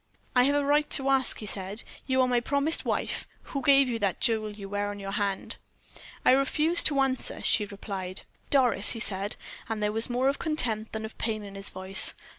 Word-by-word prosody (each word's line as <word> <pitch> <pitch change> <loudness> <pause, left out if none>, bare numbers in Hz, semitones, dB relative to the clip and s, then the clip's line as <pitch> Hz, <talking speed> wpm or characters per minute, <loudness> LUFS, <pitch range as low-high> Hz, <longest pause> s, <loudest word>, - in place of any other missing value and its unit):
"I 250 0 +6
have 285 +1 +3
a 290 -1 +1
right 295 +1 +2
to 270 -1 0
ask," 265 -2 +2
he 215 - -8
said. 195 +1 -4 0.2
"You 260 -1 +2
are - - +2
my 245 -1 +2
promised 280 +5 +1
wife. - - -2 0.2
Who 275 - -5
gave 275 0 +5
you 235 -2 -2
the 200 -3 0
jewel 220 -2 +1
you 205 -1 -9
wear 205 +1 -2
on 205 0 -6
your 195 0 -6
hand?" 200 -1 -2 0.7
"I - - +7
refuse 300 +5 +3
to 280 -2 +3
answer 265 -1 +1
you," - - -9
she 210 - +3
replied. 195 -2 -6 0.3
"Doris," 245 -7 +4
he 230 - -6
said, 200 -1 +2 0.3
and 220 -1 -2
there 210 - +1
was 225 +3 +1
more 250 +2 +1
of 275 - 0
contempt 230 -9 -1
than 220 0 -4
of 220 - -9
pain 215 -2 -1
in 200 -1 -9
his 195 0 -3
voice. 190 +1 +1
225 Hz, 220 wpm, -27 LUFS, 205-270 Hz, 0.7 s, I